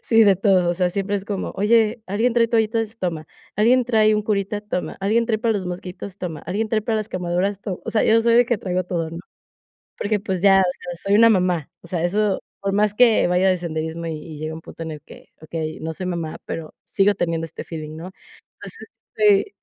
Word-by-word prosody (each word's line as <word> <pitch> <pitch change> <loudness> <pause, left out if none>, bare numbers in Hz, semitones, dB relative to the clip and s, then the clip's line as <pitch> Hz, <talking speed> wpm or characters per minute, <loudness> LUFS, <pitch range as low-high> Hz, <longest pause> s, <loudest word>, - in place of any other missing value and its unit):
Sí, 225 -1 +5
de 200 -3 +5
todo. 190 -3 +3
O - - -1
sea, 180 0 +1
siempre 200 +2 -1
es 195 - -5
como: 200 -3 -4
"Oye, 220 +2 +2
¿alguien 225 +5 +1
trae 230 -1 +4
toallitas?". 225 0 0
"Toma". 165 -4 -3 0.3
"¿Alguien 245 +4 +4
trae 215 -2 +3
un 210 - 0
curita?". 205 -1 -1
"Toma". 210 -4 -4
"¿Alguien 220 +4 +2
trae 220 -2 0
para 230 0 +1
los 190 -3 -2
mosquitos?" 180 +2 -7
"Toma". 165 -5 -5
"¿Alguien 215 +4 -1
trae 215 -1 0
para 220 0 0
las 215 0 -3
quemaduras?". 185 +3 -1
"Toma". 190 -3 -4
O - - -4
sea, 220 - +2
yo 225 +1 +5
soy 230 0 +3
de 240 0 +5
que 240 -3 0
traigo 185 -1 -2
todo, 165 -3 -3
¿no? 165 - -7 0.8
Porque 210 0 0
pues 190 -3 -3
ya, 195 -1 +6
o - - +4
sea, 175 -1 -8
soy 200 +1 +2
una 230 +2 +7
mamá. 180 -6 +1
O 170 - -14
sea, 170 -1 -2
eso 200 +2 +1 0.2
por 200 0 -2
más 210 0 +2
que 235 0 +5
vaya 180 +2 +3
de 185 - +2
senderismo 160 0 -4
y 165 - -3
y 150 0 -9
llega 155 +1 -4
un 160 - -8
punto 165 - -9
en 160 - -5
el 150 - -8
que - - -15
Okey, 155 0 -5
no 160 0 -4
soy 185 +4 -6
mamá, 170 -3 -3
pero 160 -2 -6
sigo 200 +1 +2
teniendo 165 -1 -1
este - - -8
feeling, 155 -2 -7
¿no? 180 +3 -8 0.5
Entonces, 450 - -10 0.3
este 205 -1 +3
195 Hz, 230 wpm, -22 LUFS, 175-215 Hz, 0.8 s, una